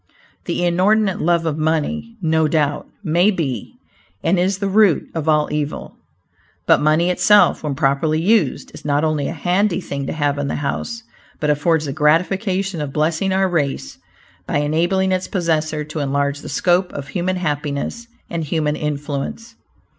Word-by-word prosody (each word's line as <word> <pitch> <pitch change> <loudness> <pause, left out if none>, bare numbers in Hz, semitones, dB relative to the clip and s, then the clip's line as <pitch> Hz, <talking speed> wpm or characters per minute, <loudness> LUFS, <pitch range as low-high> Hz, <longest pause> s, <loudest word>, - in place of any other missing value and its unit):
The 175 - -1
inordinate 190 +3 +2
love 170 0 +2
of 155 -1 -1
money, 165 +9 -1
no 160 -1 +2
doubt, 150 -2 0 0.2
may 175 +3 +3
be 140 - -3 0.5
and 175 +2 +2
is 190 +2 +1
"the 200 0 -2
root 195 -4 +3
of 160 -1 -2
all 150 -1 +3
evil," 150 -1 -3 0.7
but - - +4
money 155 +4 +3
itself, 200 0 +4
when 150 -3 -3
properly 145 +2 +1
used, 190 - +1
is - - -11
not 145 0 +1
only 155 -3 0
a - - -3
"handy 185 +1 +1
thing 140 -6 -5
to - - -2
have 145 -2 0
in 145 - -1
the - - -2
house," 230 +11 -3 0.4
but 150 -1 +1
affords 155 +1 +1
the 140 - -3
gratification 185 +4 +1
of 145 -2 -4
blessing 160 +6 0
our 190 0 +2
race 150 -6 -2 0.5
by - - 0
enabling 175 +6 +1
its 185 0 0
possessor 155 -4 -1
to 155 +1 -6
enlarge 140 0 0
the - - -9
scope 175 +4 +1
of 140 0 -6
human 185 +2 -1
happiness 150 +6 -3 0.2
and 165 -2 -3
human 150 -1 0
influence. 150 +10 -4
160 Hz, 165 wpm, -20 LUFS, 150-185 Hz, 0.7 s, but